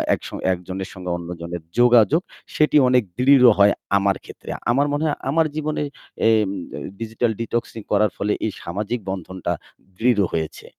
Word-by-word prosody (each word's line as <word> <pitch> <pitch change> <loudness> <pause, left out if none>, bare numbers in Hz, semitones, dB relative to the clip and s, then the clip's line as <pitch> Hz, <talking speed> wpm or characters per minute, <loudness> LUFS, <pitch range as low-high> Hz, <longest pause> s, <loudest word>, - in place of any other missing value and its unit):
একস - - -10 0.2
একজনের 95 +2 -6
সঙ্গে 90 -2 -7
অন্যজনের 85 0 -6 0.2
যোগাযোগ, 120 +6 +5 0.3
সেটি 150 0 +4
অনেক 125 -2 +4 0.2
দৃঢ় 130 0 +6
হয় 100 0 +6 0.2
আমার 100 0 +2
ক্ষেত্রে। - - -12 0.2
আমার 140 +4 +2
মনে 150 +2 0
হয় 150 - 0
আমার 160 +2 +3
জীবনে 155 -1 -2 0.5
এইম 110 -3 +3 0.2
ত - - -11 0.3
digital 115 +1 -1
detoxing 115 -2 -3
করার 105 -3 +3
ফলে 105 +1 0
এই 110 - -1
সামাজিক 105 +7 -3
বন্ধনটা 95 -1 -3 0.5
দৃঢ় 115 -3 +3
হয়েছে। 80 -1 -4
110 Hz, 150 wpm, -22 LUFS, 95-125 Hz, 0.5 s, দৃঢ়